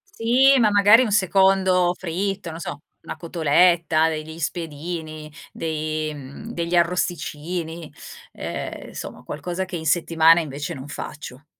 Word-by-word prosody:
Sì, 260 +4 +4
ma 220 -3 +4
magari 205 +3 +6
un 230 -5 0
secondo 190 -2 +3
fritto, 190 +1 -3
non 160 - -8
so, 145 -3 -6 0.2
una - - -7
cotoletta, 165 0 +3
degli 160 0 -6
spiedini, 155 -1 -5 0.2
dei 155 -1 -3
mhmm, 145 - -9
degli 170 -4 -2
arrosticini, 170 -1 -2 0.4
ehm, - - -6
insomma, - - -8
qualcosa 175 +5 -4
che 185 - -7
in 160 -2 -4
settimana 165 +1 +4
invece 150 -2 -5
non 135 +1 -9
faccio. 145 -1 -8
170 Hz, 130 wpm, -23 LUFS, 155-185 Hz, 0.4 s, magari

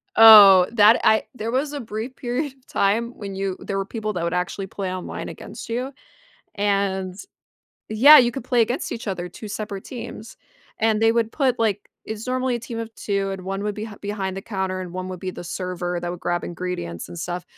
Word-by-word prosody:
Oh, 205 -5 +10
that 220 0 +6
I 220 - +4
there 225 0 -4
was 280 +4 -1
a 290 - -4
brief 225 +2 -6
period 255 +3 -3
of 265 -1 -31
time 220 +4 +1
when 200 -2 -7
you 195 -1 -3
there 195 - -4
were 195 - -1
people 215 +1 -4
that 175 -3 -3
would 170 0 -1
actually 185 +2 -2
play 195 -1 -4
online 185 -1 -6
against - - -9
you, 250 +4 -2 0.6
and 195 -2 0 0.7
yeah, 265 +8 +8
you 240 -2 +4
could 240 0 -7
play 245 -1 +2
against 240 +4 0
each 230 - -6
other, 180 -2 -3
2 210 +4 -10
separate 200 -2 -5
teams, 230 -3 -8 0.4
and 220 -1 +2
they 225 0 +4
would 230 -1 0
put 260 -4 +1
like, 210 -3 -1 0.2
it's 220 +1 -6
normally 255 0 0
a - - -5
team 230 0 -6
of 225 0 -6
2, 200 -2 -2
and 190 -1 -5
1 195 +1 -3
would 210 -1 -2
be 215 +2 -6
behind 200 -2 -4
the 195 - -5
counter, 190 -3 -3
and 180 -2 -7
1 185 0 -5
would 185 -2 -7
be 185 - -3
the 175 - -9
server 180 0 -3
that 175 - -3
would 175 0 -7
grab 175 0 -1
ingredients 170 - -5
and 175 - -9
stuff, 175 +1 -4
205 Hz, 215 wpm, -23 LUFS, 185-230 Hz, 0.7 s, Oh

